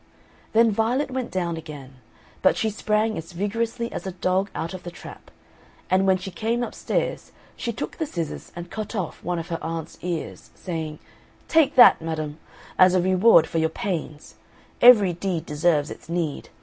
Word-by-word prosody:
Then 225 Hz, 0 st, +5 dB
Violet 235 Hz, +7 st, 0 dB
went 255 Hz, -1 st, -3 dB
down 170 Hz, -3 st, -2 dB
again, 140 Hz, -4 st, -10 dB, 0.4 s
but 185 Hz, -, +4 dB
she 220 Hz, -, 0 dB
sprang 215 Hz, 0 st, 0 dB
as 165 Hz, +2 st, -10 dB
vigorously 230 Hz, +5 st, -2 dB
as -, -, -5 dB
a 190 Hz, -, -4 dB
dog 185 Hz, +2 st, 0 dB
out 165 Hz, -, -4 dB
of 185 Hz, -, -7 dB
the 175 Hz, -, -7 dB
trap, 175 Hz, -, -12 dB, 0.6 s
and 190 Hz, +1 st, +3 dB
when 190 Hz, -1 st, +4 dB
she 190 Hz, +1 st, -7 dB
came 225 Hz, +7 st, -1 dB
upstairs -, -, -3 dB, 0.2 s
she 235 Hz, -, -3 dB
took 220 Hz, -, -6 dB
the 320 Hz, -, -2 dB
scissors 170 Hz, -, -5 dB
and 175 Hz, 0 st, -8 dB
cut 215 Hz, +1 st, -5 dB
off 185 Hz, -6 st, -4 dB
one 175 Hz, 0 st, -2 dB
of 165 Hz, +1 st, -5 dB
her 165 Hz, -, -3 dB
aunt's 165 Hz, -1 st, -5 dB
ears, 175 Hz, -2 st, -5 dB
saying, 160 Hz, -3 st, -5 dB, 0.5 s
"Take 320 Hz, -2 st, +3 dB
that, 245 Hz, -8 st, +8 dB
madam, 155 Hz, -1 st, -4 dB, 0.4 s
as 185 Hz, 0 st, +7 dB
a -, -, +4 dB
reward 185 Hz, +1 st, +5 dB
for 165 Hz, -, -2 dB
your 160 Hz, 0 st, +2 dB
pains 160 Hz, -4 st, -5 dB, 0.4 s
every 215 Hz, -7 st, +8 dB
deed 175 Hz, -1 st, -3 dB
deserves 150 Hz, -1 st, +1 dB
its -, -, -11 dB
need. 170 Hz, -4 st, -3 dB
185 Hz, 175 wpm, -24 LUFS, 165-220 Hz, 0.6 s, that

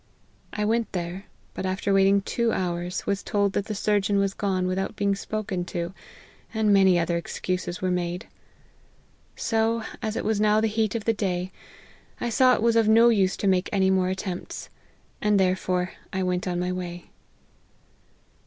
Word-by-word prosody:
I 210 Hz, -, -2 dB
went 230 Hz, +1 st, 0 dB
there: 180 Hz, +2 st, -4 dB, 0.3 s
but -, -, -5 dB
after 190 Hz, +1 st, -1 dB
waiting 195 Hz, +1 st, +4 dB
two 235 Hz, +2 st, 0 dB
hours, 175 Hz, -1 st, -2 dB
was 200 Hz, -1 st, -1 dB
told 200 Hz, -2 st, 0 dB
that 200 Hz, -, -1 dB
the 215 Hz, -, -4 dB
surgeon 205 Hz, 0 st, +1 dB
was 200 Hz, -1 st, +1 dB
gone 190 Hz, -3 st, -1 dB
without 190 Hz, +3 st, -2 dB
being 200 Hz, -1 st, +1 dB
spoken 195 Hz, -2 st, -3 dB
to, 175 Hz, 0 st, -4 dB, 0.6 s
and 215 Hz, -2 st, +3 dB
many 190 Hz, -2 st, +5 dB
other 170 Hz, 0 st, +1 dB
excuses 180 Hz, +1 st, -3 dB
\vere 185 Hz, -1 st, 0 dB
made. 180 Hz, 0 st, -2 dB, 1.1 s
So, 225 Hz, 0 st, 0 dB, 0.2 s
as 215 Hz, 0 st, -2 dB
it -, -, -3 dB
was 215 Hz, -1 st, +1 dB
now 215 Hz, 0 st, +4 dB
the 220 Hz, -, +2 dB
heat 220 Hz, 0 st, 0 dB
of 225 Hz, -, -3 dB
the 225 Hz, -, +3 dB
day, 185 Hz, -3 st, -2 dB, 0.7 s
I 240 Hz, -, -1 dB
saw 255 Hz, +1 st, +5 dB
it -, -, -2 dB
was 230 Hz, -1 st, +3 dB
of 225 Hz, -1 st, +4 dB
no 230 Hz, +2 st, +7 dB
use 195 Hz, -5 st, +2 dB
to 200 Hz, -, -1 dB
make 185 Hz, 0 st, +2 dB
any 190 Hz, -2 st, +3 dB
more 185 Hz, -1 st, +2 dB
attempts; 185 Hz, -1 st, -5 dB, 0.5 s
and 210 Hz, -1 st, +3 dB
therefore 185 Hz, -1 st, +1 dB, 0.2 s
I 190 Hz, 0 st, -1 dB
went 180 Hz, 0 st, -1 dB
on 175 Hz, -1 st, -1 dB
my 180 Hz, 0 st, -1 dB
way." 175 Hz, -1 st, -6 dB
195 Hz, 175 wpm, -25 LUFS, 180-215 Hz, 1.1 s, no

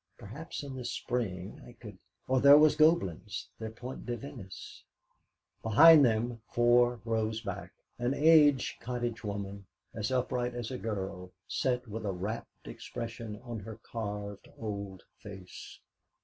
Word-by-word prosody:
Perhaps 140 Hz, -, -7 dB
in 140 Hz, -2 st, -7 dB
the 130 Hz, -, -6 dB
spring 110 Hz, -6 st, -3 dB
I 120 Hz, -, -13 dB
could 105 Hz, -6 st, -12 dB, 0.3 s
Or 130 Hz, 0 st, +3 dB
there 140 Hz, +1 st, +9 dB
was 150 Hz, 0 st, +6 dB
Goblin's, 115 Hz, -, +2 dB
their 110 Hz, -1 st, -4 dB
Point 125 Hz, +4 st, -8 dB
de 120 Hz, -1 st, -2 dB
Venise 95 Hz, -9 st, -10 dB, 0.4 s
' -, -, -51 dB
Behind 150 Hz, +8 st, +8 dB
them, 115 Hz, -1 st, +1 dB
four 120 Hz, 0 st, +4 dB
rows 110 Hz, -1 st, -1 dB
back, 100 Hz, -2 st, -6 dB, 0.3 s
an 120 Hz, +3 st, 0 dB
aged 150 Hz, -4 st, +5 dB
cottage 120 Hz, -1 st, -3 dB
woman, 100 Hz, -1 st, -5 dB, 0.3 s
as 110 Hz, +2 st, -3 dB
upright 125 Hz, -1 st, -1 dB
as 120 Hz, 0 st, -4 dB
a 125 Hz, -, -4 dB
girl, 95 Hz, -4 st, -4 dB, 0.2 s
sat 125 Hz, -1 st, -1 dB
with 110 Hz, +1 st, -6 dB
a 100 Hz, -, -1 dB
rapt 100 Hz, +5 st, -6 dB
expression 115 Hz, -3 st, -6 dB
on 120 Hz, -3 st, -5 dB
her 110 Hz, +2 st, -9 dB
carved 105 Hz, -3 st, -6 dB
old 100 Hz, -3 st, -5 dB, 0.2 s
face. 95 Hz, -3 st, -10 dB
115 Hz, 145 wpm, -31 LUFS, 105-125 Hz, 0.4 s, there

